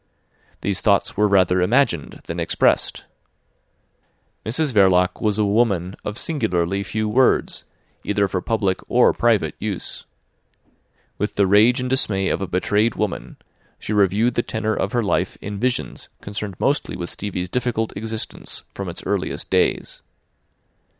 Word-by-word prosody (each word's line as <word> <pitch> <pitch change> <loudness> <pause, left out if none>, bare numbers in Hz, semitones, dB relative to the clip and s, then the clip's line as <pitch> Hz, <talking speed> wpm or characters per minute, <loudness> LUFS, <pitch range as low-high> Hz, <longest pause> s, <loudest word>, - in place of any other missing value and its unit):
These 100 -1 -1
thoughts 100 -2 +2
were 105 +1 +3
rather 95 -2 +3
imagined 90 - +1
than - - -5
expressed. - - +1 1.4
Mrs 135 +5 0
Verloc 95 -3 +3
was 105 -2 +1
a 105 - +2
woman 100 -4 +1
of 105 +1 -4
singularly 100 - 0
few 110 +2 -2
words, 125 +4 +2 0.4
either 100 -1 +1
for 95 -1 -2
public 100 -3 0
or - - +4
private - - +2
use. - - -5 1.1
With - - -2
the 100 - +3
rage 105 +6 +5
and 125 - -2
dismay 105 -7 +1
of - - -1
a 95 - -2
betrayed 105 +5 +1
woman, 105 -5 -3 0.4
she 105 - -4
reviewed 105 +4 +3
the 120 - +1
tenor 110 -1 -2
of 100 -1 -1
her 120 -1 +1
life 100 - 0
in 100 0 -6
visions 125 +2 -1
concerned 100 -1 -5
mostly 145 +1 0
with 85 -1 -4
Stevie's 95 -3 -4
difficult 115 +1 -2
existence 110 +2 -4
from 100 -2 -5
its 85 - -7
earliest 100 -1 -2
days. - - +1
105 Hz, 145 wpm, -21 LUFS, 95-110 Hz, 1.4 s, rage